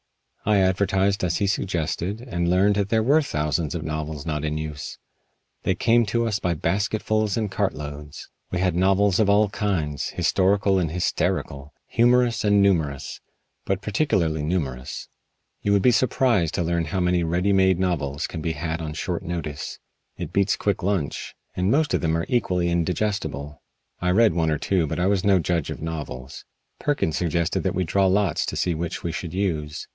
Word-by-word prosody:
I 105 Hz, -1 st, +3 dB
advertised 95 Hz, +1 st, +2 dB
as 85 Hz, -2 st, +1 dB
he 100 Hz, -, +1 dB
suggested 95 Hz, +1 st, -1 dB
and 85 Hz, -9 st, -2 dB
learned 95 Hz, +3 st, +4 dB
that 100 Hz, -1 st, 0 dB
there 110 Hz, -1 st, +2 dB
were 145 Hz, +7 st, +4 dB
thousands 75 Hz, -, -1 dB
of 80 Hz, -, -3 dB
novels 75 Hz, -2 st, -4 dB
not 75 Hz, -2 st, -2 dB
in 75 Hz, 0 st, -1 dB
use. 75 Hz, -1 st, -6 dB, 0.6 s
They 95 Hz, -, 0 dB
came 120 Hz, +5 st, +3 dB
to 115 Hz, +3 st, +1 dB
us 105 Hz, -3 st, 0 dB
by 85 Hz, -1 st, 0 dB
basketfuls 105 Hz, +5 st, 0 dB
and 110 Hz, -3 st, -1 dB
cartloads. 75 Hz, -7 st, -4 dB, 0.2 s
We 90 Hz, -, -2 dB
had 90 Hz, -1 st, +1 dB
novels 95 Hz, +2 st, +3 dB
of 105 Hz, -2 st, +3 dB
all 105 Hz, 0 st, +4 dB
kinds 85 Hz, -9 st, -2 dB
historical 95 Hz, 0 st, +2 dB
and 85 Hz, -4 st, 0 dB
hysterical, 75 Hz, -4 st, -2 dB
humorous 120 Hz, 0 st, +3 dB
and 105 Hz, -1 st, +4 dB
numerous, 80 Hz, -8 st, 0 dB, 0.4 s
but 95 Hz, +1 st, -1 dB
particularly 95 Hz, -, +1 dB
numerous. 70 Hz, -6 st, -3 dB, 0.5 s
You 100 Hz, -, 0 dB
would 100 Hz, -1 st, +3 dB
be 125 Hz, -, +6 dB
surprised 115 Hz, -, +2 dB
to -, -, 0 dB
learn 85 Hz, 0 st, 0 dB
how 90 Hz, +5 st, -2 dB
many 90 Hz, -1 st, +2 dB
ready 90 Hz, +4 st, +1 dB
made 95 Hz, -2 st, +4 dB
novels 80 Hz, -6 st, -1 dB
can 80 Hz, -, -5 dB
be 80 Hz, 0 st, -1 dB
had 80 Hz, +1 st, -3 dB
on 75 Hz, -2 st, -4 dB
short 85 Hz, +2 st, -3 dB
notice. 80 Hz, -4 st, -5 dB, 0.4 s
It 90 Hz, -1 st, -6 dB
beats 100 Hz, 0 st, +2 dB
quick 100 Hz, -2 st, -1 dB
lunch. 90 Hz, -6 st, -2 dB, 0.2 s
And 90 Hz, +1 st, 0 dB
most 150 Hz, +5 st, +2 dB
of -, -, +1 dB
them 80 Hz, -1 st, +1 dB
are 85 Hz, -, -2 dB
equally 90 Hz, -8 st, +1 dB
indigestible. 85 Hz, -4 st, -2 dB, 0.4 s
I 90 Hz, -, +1 dB
read 105 Hz, +1 st, +4 dB
one 80 Hz, -1 st, +1 dB
or 75 Hz, -, +1 dB
two 90 Hz, 0 st, 0 dB
but 70 Hz, -, -3 dB
I 90 Hz, -, +2 dB
was 100 Hz, -1 st, +2 dB
no 100 Hz, -2 st, +4 dB
judge 85 Hz, -2 st, 0 dB
of -, -, -6 dB
novels. 70 Hz, -5 st, -6 dB, 0.4 s
Perkins 140 Hz, -, 0 dB
suggested 85 Hz, -1 st, 0 dB
that -, -, -1 dB
we 95 Hz, -, +1 dB
draw 95 Hz, +3 st, +2 dB
lots 100 Hz, +1 st, +1 dB
to -, -, -3 dB
see 90 Hz, -, 0 dB
which 85 Hz, +1 st, -4 dB
we 85 Hz, -, -2 dB
should 85 Hz, +1 st, -5 dB
use. 80 Hz, -7 st, -2 dB
90 Hz, 180 wpm, -24 LUFS, 80-100 Hz, 0.6 s, be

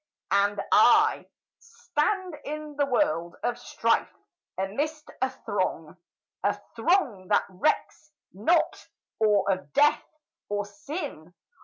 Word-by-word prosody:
And 200 Hz, +1 st, +2 dB
I, -, -, +5 dB, 0.3 s
Stand 380 Hz, -6 st, -2 dB
in 300 Hz, 0 st, -6 dB
the 285 Hz, 0 st, +1 dB
world 240 Hz, -, 0 dB
of 240 Hz, 0 st, -1 dB
strife, -, -, 0 dB, 0.5 s
amidst 290 Hz, +11 st, -3 dB
a -, -, +2 dB
throng, -, -, -3 dB, 0.5 s
A -, -, +1 dB, 0.2 s
throng 250 Hz, -, +1 dB
that 205 Hz, -, +3 dB
recks 305 Hz, +9 st, -1 dB, 0.2 s
not 275 Hz, -, +1 dB, 0.3 s
or 210 Hz, -3 st, +3 dB
of 185 Hz, -7 st, -3 dB
death, 295 Hz, +1 st, +4 dB, 0.5 s
or 205 Hz, 0 st, -1 dB
sin! 205 Hz, -, -7 dB
245 Hz, 110 wpm, -27 LUFS, 200-305 Hz, 0.5 s, I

